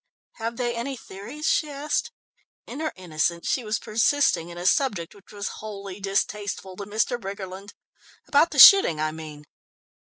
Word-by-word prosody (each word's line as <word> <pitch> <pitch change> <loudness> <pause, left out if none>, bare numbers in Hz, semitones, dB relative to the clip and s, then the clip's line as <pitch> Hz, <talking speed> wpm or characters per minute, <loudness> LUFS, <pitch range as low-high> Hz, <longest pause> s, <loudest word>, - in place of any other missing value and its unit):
"Have 230 +1 -4
they 240 -1 -1
any 255 +3 -4
theories?" 225 +9 -9
she 305 - +1
asked. 290 +1 -2 0.5
In - - -8
her 315 0 -2
innocence 170 -1 -2
she 255 - 0
was 215 0 -1
persisting 215 - +1
in 175 - -10
a 175 - -6
subject 205 - +1
which 200 -2 -19
was 205 -1 -5
wholly 200 -2 -8
distasteful 195 -1 -3
to 200 - -6
Mr. 220 +4 -1
Briggerland. 195 0 -8 0.5
"About 295 +4 +4
the - - -7
shooting 385 - +9
I 155 0 0
mean?" 155 -2 -9
205 Hz, 160 wpm, -25 LUFS, 185-245 Hz, 0.5 s, shooting